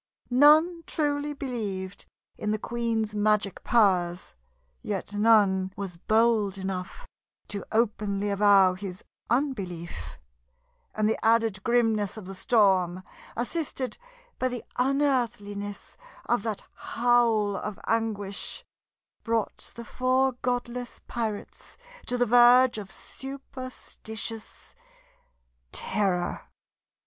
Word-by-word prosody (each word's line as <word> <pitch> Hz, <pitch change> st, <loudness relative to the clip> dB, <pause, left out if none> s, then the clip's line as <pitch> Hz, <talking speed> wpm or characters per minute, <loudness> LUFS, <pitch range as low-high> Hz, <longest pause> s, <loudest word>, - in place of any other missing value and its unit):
None 310 Hz, +6 st, +6 dB
truly 295 Hz, -1 st, 0 dB
believed 205 Hz, -8 st, -4 dB, 0.3 s
in 210 Hz, -, -3 dB
the 215 Hz, -, +1 dB
queen's 225 Hz, -1 st, -2 dB
magic 210 Hz, -1 st, +1 dB
powers; 185 Hz, -6 st, +2 dB, 0.5 s
yet 205 Hz, 0 st, -4 dB
none 205 Hz, -3 st, +4 dB
was 190 Hz, -3 st, -4 dB
bold 215 Hz, 0 st, +2 dB
enough 190 Hz, -1 st, -5 dB, 0.4 s
to 200 Hz, -1 st, -4 dB
openly 205 Hz, -2 st, 0 dB
avow 200 Hz, -2 st, +5 dB
his 185 Hz, 0 st, -7 dB, 0.3 s
unbelief; 175 Hz, -, -2 dB, 0.8 s
and 215 Hz, 0 st, +2 dB
the 220 Hz, -, -1 dB
added 225 Hz, -3 st, +3 dB
grimness 225 Hz, -4 st, +1 dB
of 215 Hz, -, -8 dB
the 195 Hz, -, -7 dB
storm, 185 Hz, -4 st, +2 dB, 0.3 s
assisted 265 Hz, -, -3 dB, 0.4 s
by 255 Hz, -, +2 dB
the 245 Hz, -2 st, -4 dB
unearthliness 240 Hz, -7 st, -1 dB, 0.3 s
of 240 Hz, -, +1 dB
that 215 Hz, -1 st, -3 dB
howl 230 Hz, -4 st, +2 dB
of 210 Hz, 0 st, -5 dB
anguish, 210 Hz, -3 st, -1 dB, 0.6 s
brought 230 Hz, -2 st, -2 dB
the 235 Hz, -, -8 dB
four 255 Hz, +3 st, +2 dB
godless 245 Hz, 0 st, -3 dB
pirates 220 Hz, -4 st, -5 dB, 0.3 s
to 245 Hz, -, 0 dB
the 245 Hz, -, +3 dB
verge 245 Hz, 0 st, +6 dB
of 195 Hz, -2 st, -8 dB
superstitious 255 Hz, -5 st, -6 dB, 1.0 s
terror. 190 Hz, -4 st, -1 dB
220 Hz, 100 wpm, -27 LUFS, 200-245 Hz, 1.0 s, None